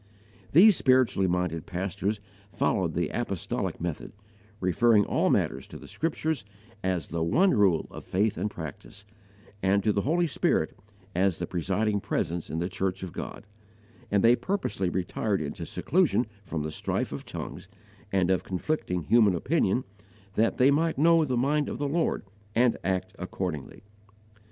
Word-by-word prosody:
These 195 +6 +8
spiritually 130 -7 +3
minded 90 -3 -1
pastors 95 +3 -2 0.3
followed - - 0
the - - 0
apostolic - - -3
method, 85 -2 -4 0.5
referring 105 +3 +4
all - - +1
matters 65 - 0
to - - -9
the - - -12
Scriptures 160 - -2 0.4
as 95 -2 -1
the 85 0 -2
one 180 - +4
rule 95 -7 +3
of - - -9
faith 105 +3 0
and 105 - -2
practice, 90 +3 -9 0.6
and 95 +1 +2
to 105 - +2
the 100 - +1
Holy 170 +7 +2
Spirit 155 - 0 0.4
as 95 -1 +2
the 90 - -3
presiding 100 +5 0
Presence 85 -3 -2
in 80 - -3
the 85 +1 -1
church 95 0 -2
of 90 - -6
God; - - -7 0.6
and 100 -1 +2
they 115 +1 +7
purposely 185 - -2
retired 95 +3 -1
into 75 -2 -5
seclusion 175 -8 +2 0.2
from 80 -4 -3
the 75 - -3
strife - - -2
of - - -5
tongues - - -7 0.4
and 95 -2 +2
of 95 - +1
conflicting 90 - -2
human 105 +2 +4
opinion, 125 - +1 0.5
that 115 +3 +1
they 130 +2 +5
might 160 +2 +1
know 165 +2 +5
the 130 -4 -1
mind 145 +4 +1
of - - -4
the 145 - -1
Lord 165 -6 0 0.3
and 120 +1 +4
act 95 +1 -1
accordingly. 90 -3 -5
100 Hz, 155 wpm, -28 LUFS, 90-130 Hz, 0.6 s, These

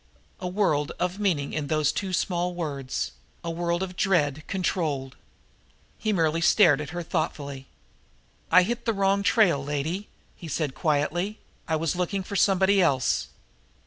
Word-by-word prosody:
A 180 - -4
world 180 -7 +1
of 180 +2 -1
meaning 170 -9 0
in 150 -2 -2
those 155 -1 +2
two 195 -2 -3
small 180 0 -1
words 140 -6 -3 0.3
a 170 - -3
world 170 +1 -1
of 185 -1 -6
dread 155 -6 +1
controlled. 155 -8 -1 0.8
He 215 - 0
merely 165 -4 +1
stared 170 -5 +5
at 150 - -6
her 175 +1 -4
thoughtfully. 140 -4 -3 0.8
"I 180 +2 +7
hit 235 +5 -3
the 230 - +2
wrong 195 0 +2
trail, 185 -9 +3
lady," 150 +8 -3 0.3
he 170 - -10
said 155 -3 -2
quietly. 170 +8 0 0.3
"I 160 - +1
was 160 +2 -1
looking 180 +2 -1
for 200 - -7
somebody 195 0 +4
else." 135 -7 +2
170 Hz, 150 wpm, -26 LUFS, 150-190 Hz, 0.8 s, I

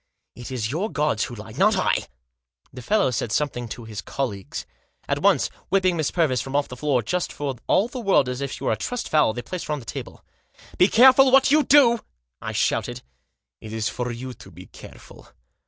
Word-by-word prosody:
" - - -54
It 120 - -9
is 120 -4 -3
your 185 +9 -2
gods 150 -7 0
who 120 - -8
lie, 110 0 -10
not 195 - +3
I." 185 - 0 0.7
The 125 - -8
fellow 200 - +1
said 120 -2 -2
something 120 -3 -1
to 115 +1 -8
his 110 -2 -6
colleagues. 105 -9 -5 0.4
At - - -1
once, - - +3 0.2
whipping 185 -2 +2
Miss 155 -4 0
Purvis 145 -9 +1
from 135 +1 -6
off 145 0 +1
the 125 - -8
floor, 130 -2 0
just 180 +11 -2
for 140 -3 -4
all 200 - +3
the 250 +1 -7
world 195 - +3
as 125 +1 -4
if 140 -1 -3
she - - -7
were - - +1
a - - +1
trussed 245 -1 -4
fowl, 150 -8 +3
they 120 +1 -6
placed 180 -2 -6
her 150 - -1
on 150 - -3
the 120 - -13
table. - - -8 0.2
" - - -21
Be 180 - +7
careful 260 +4 +6
what 270 +1 +5
you 305 +1 +5
do! 265 -6 +5 0.2
" - - -58
I - - -4
shouted. - - -1 0.3
" - - -59
It 110 - -9
is 110 -1 -1
for 125 0 -4
you 125 +2 -7
to - - -15
be - - -13
careful. - - -14
140 Hz, 230 wpm, -23 LUFS, 120-190 Hz, 0.7 s, Be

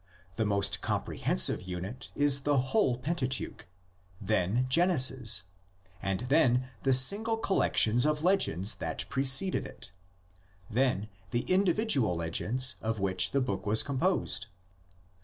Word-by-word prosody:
The 110 0 -1
most 100 -1 0
comprehensive 65 +1 -1
unit 95 +7 -7
is 145 -1 +3
the 145 0 0
whole 130 - 0
Pentateuch, 130 - -3 0.5
then 110 +4 -1
Genesis, 130 - +2 0.6
and 95 +1 -3
then 125 -2 +1
the 135 - 0
single 205 - +4
collections 125 - +1
of 150 0 -2
legends 125 - +2
that - - -3
preceded 140 +7 +1
it; - - -9 0.8
then 120 -3 -1 0.2
the 120 +5 -2
individual 185 - +1
legends 110 +10 0
of 110 -1 -3
which 95 -1 +2
the 140 - -1
book 105 -4 -4
was 110 +2 +4
composed. 140 -3 -1
130 Hz, 120 wpm, -29 LUFS, 105-145 Hz, 0.8 s, single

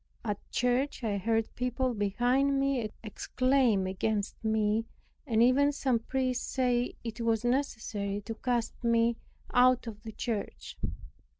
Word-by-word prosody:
At 205 -2 -1
church 250 +2 0
I 205 -3 0
heard 225 +2 0
people 250 +1 -1
behind 245 +7 +2
me 270 -5 0
exclaim 245 -1 +1
against 200 +3 -2
me, 220 0 +1 0.4
and 230 -2 +4
even 275 +4 +4
some 260 -4 +1
priests 255 +1 -1
say 250 -2 +1
it 230 -1 -5
was 230 0 +1
necessary 225 -6 -1
to 225 +3 -5
cast 240 +1 -2
me 235 0 +3 0.4
out 250 0 +5
of 215 -2 -7
the 220 - -7
church. 220 -1 -4
235 Hz, 130 wpm, -30 LUFS, 220-255 Hz, 0.4 s, out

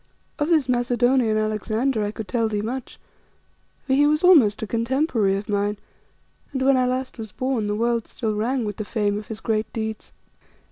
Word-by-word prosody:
Of 295 +2 0
this 310 -6 +3
Macedonian 245 -2 +2
Alexander 215 +3 0
I 205 - -1
could 215 0 -7
tell 230 -2 0
thee 210 -1 -2
much, 250 +3 -5 0.9
for 265 - 0
he 290 +2 +5
was 305 +2 +1
almost 260 - +5
a - - 0
contemporary 230 -2 +1
of 200 - -6
mine, 205 0 0 0.7
and 265 -1 -2
when 270 0 +5
I 255 -1 +2
last 255 0 -3
was 220 -2 -7
born 255 -3 -1
the 205 - -1
world 235 +1 0
still 220 -3 -3
rang 235 +3 -1
with 205 -2 -4
the 215 - -3
fame 205 -1 -1
of 210 - -11
his 220 -1 -7
great 220 -1 -1
deeds. 220 -1 -5
230 Hz, 190 wpm, -23 LUFS, 215-260 Hz, 0.9 s, he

